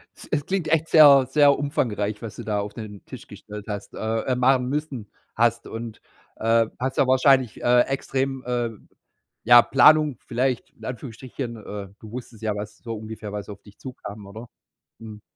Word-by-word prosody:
Es - - -12
es 145 -2 0
klingt 190 -4 -2
echt 160 0 +1
sehr 140 -4 +8
sehr 145 -1 +5
umfangreich, 110 -8 -2
was 115 -3 -7
du - - -8
da 105 -1 -1
auf 100 0 -5
den 105 -3 -9
Tisch - - -10
gestellt 105 0 -10
hast, 105 -2 -6
äh, 110 +1 -2
äh, 130 - 0
machen 125 0 +2
müssen 140 -7 -4 0.3
hast 115 0 +1
und, 115 -1 -7 0.3
äh, 115 0 +2
hast 130 +1 -3
ja 135 - +3
wahrscheinlich, 130 -2 +3
äh, 125 0 +5
extrem, 135 -1 -2
ähm 120 -3 -3 0.6
ja, 120 +1 +9
Planung 150 0 +5
vielleicht, 125 0 -1
in 110 - -14
Anführungsstrichen. 125 0 -6
Äh, 105 -2 -8
du 110 - -12
wusstest 120 -3 -9
ja, 105 -2 -1
was 105 0 -7
so 115 -1 -6
ungefähr 110 -1 -8
was 105 0 -6
auf 100 - -10
dich 105 -1 -18
zukam, 110 -5 -9
oder? 110 +4 -10 0.5
Hm. 110 -2 -10
120 Hz, 180 wpm, -24 LUFS, 110-135 Hz, 0.6 s, ja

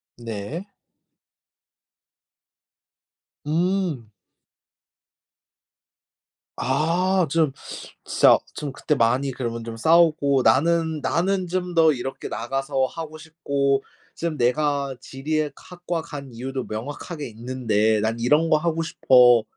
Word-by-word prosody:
네. 115 - -6 2.8
음. 165 - -1 2.5
아 170 +6 +1
좀 160 -2 +2 0.5
진짜 - - +5 0.2
좀 145 -2 -4
그때 150 +3 -1
많이 130 +3 +2
그러면 115 -2 -4
좀 115 0 -7
싸우고 155 -2 +4
"나는, 160 +2 +2
나는 180 +5 0
좀 180 +1 -2
더 160 -2 +5
이렇게 130 +1 -5
나가서 135 +3 -1
하고 155 +1 -7
싶고 140 -4 -1 0.3
지금 165 -3 -3
내가 140 +2 0
지리에 150 +2 -2
학과 175 -2 -5
간 140 -6 -9
이유도 130 +2 -4
명확하게 145 +7 -6
있는데 110 -2 0
난 115 +2 -1
이런 150 +7 +3
거 155 - +5
하고 165 0 -1
싶어." 125 -7 +5
145 Hz, 190 characters per minute, -23 LUFS, 125-165 Hz, 2.8 s, 진짜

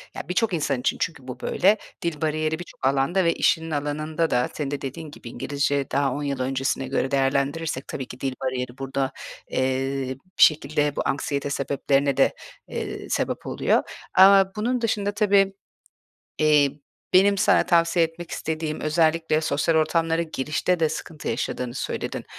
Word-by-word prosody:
ya - - -4
birçok 195 +3 +1
insan 145 -5 0
için - - 0
çünkü 145 -6 -3
bu 125 -1 -7
böyle. 200 +10 +3 0.2
Dil 170 -4 -3
bariyeri 155 0 0
birçok 175 -6 -8
alanda 140 +8 +2
ve 170 - +3
işinin 160 0 +1
alanında 155 +2 -1
da 125 - +1
senin 145 -2 -3
de 145 - -3
dediğin 150 +3 -6
gibi 125 - -10
İngilizce 140 +1 -1
daha 140 -1 +1
10 145 - -4
yıl 140 -2 -2
öncesine 135 +1 -1
göre 135 0 -1
değerlendirirsek 140 +2 0
tabii 130 - -5
ki 125 - -10
dil 135 -1 -2
bariyeri 125 -1 -3
burada, 135 0 -2 0.4
eee, 130 0 -1 0.2
bir - - +7
şekilde 150 -1 +3
bu - - -1
anksiyete 140 0 -1
sebeplerine 140 0 0
de, 135 - +4 0.3
eee, - - -5
sebep - - -2
oluyor - - +1 0.3
ama 195 +1 +7
bunun 240 +3 -1
dışında 205 -3 0
tabii, 200 -2 +3 0.9
eee, 150 -2 +4 0.4
benim 200 +2 +5
sana - - +4
tavsiye 170 -1 +3
etmek 165 +1 -7
istediğim, 155 -1 -3
özellikle 160 0 +2
sosyal 160 +1 +1
ortamlara 165 +1 +2
girişte 160 +3 -1
de 160 - +3
sıkıntı 155 0 -6
yaşadığını 125 -1 -3
söyledin. - - -4
150 Hz, 160 wpm, -24 LUFS, 135-165 Hz, 0.9 s, bir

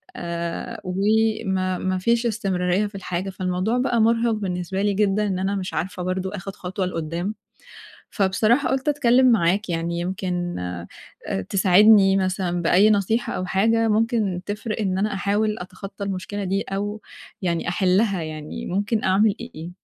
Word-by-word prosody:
آآ، 170 0 -4
وما 195 -1 +1
ما 185 +1 -1
فيش 235 +5 +1
استمرارية 195 -3 0
في 205 - -13
الحاجة، 185 0 -3
فالموضوع 185 +5 -1
بقى 250 -2 +1
مُرهِق 230 +1 +3
بالنسبة 190 -2 -2
لي 205 -1 +2
جدًا 210 +1 +1
إن 185 -2 -1
أنا 195 +1 -1
مش 190 -1 -4
عارفة 180 +1 -3
برضه 185 +1 -2
آخُد 195 +1 -7
خطوة 185 0 -3
لقُدّام، 170 +4 -3 0.8
فبصراحة 215 +7 +2
قُلت 265 +2 -1
أتكلّم 255 -3 +4
معاك 195 -1 +2
يعني 170 +1 -2
يمكن 180 -1 -3
آآ، 90 -1 -5 0.6
تساعدني 195 +1 +6
مثلًا 185 -2 -1
بأي 190 +5 +5
نصيحة 215 +3 +1
أو 185 - -3
حاجة 225 +4 +2
ممكن 215 -4 +1
تفرق 215 +2 -3
إن 190 -3 0
أنا 210 +1 0
أحاول 210 +2 0
أتخطّى 195 +2 -7
المشكلة 200 +1 -4
دي 195 +1 0
أو 205 +2 -4 0.4
يعني 170 -2 -1
أحلّها، 190 +1 +2
يعني 155 -1 -6
ممكن 205 +4 -1
أعمل 195 +3 +4
إ 240 - -6
إيه؟ 165 +2 -7
195 Hz, 150 wpm, -23 LUFS, 180-215 Hz, 0.8 s, تساعدني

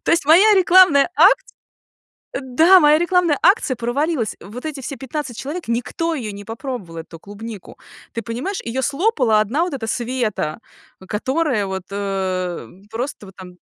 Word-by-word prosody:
То - - +2
есть 335 -4 +1
моя 390 +7 +6
рекламная 360 -5 +5
акц - - +6 1.0
да, 320 +9 +5
моя 300 -1 +5
рекламная 345 -3 +2
акция 380 - +3
провалилась! 245 +1 -1
Вот 245 +8 -9
эти 295 -3 -5
все 275 - -6
15 265 -1 -6
человек, 300 +4 -6
никто 250 +8 -2
её 235 -9 -4
не 200 0 -10
попробовал, 225 - -7
эту 165 0 -13
клубнику. 205 +1 -10 0.4
Ты 230 - -3
понимаешь, 245 - -4
её 245 +3 -3
слопала 275 - +2
одна 260 +11 0
вот 355 -4 -3
эта 230 -4 -5
Света, 230 -9 -2 0.5
которая 260 0 -1
вот, 190 -1 -5
э, 190 -3 -3 0.2
просто 240 -1 -5
вот 190 - -15
там 180 -1 -12
250 Hz, 155 wpm, -20 LUFS, 210-315 Hz, 1.0 s, моя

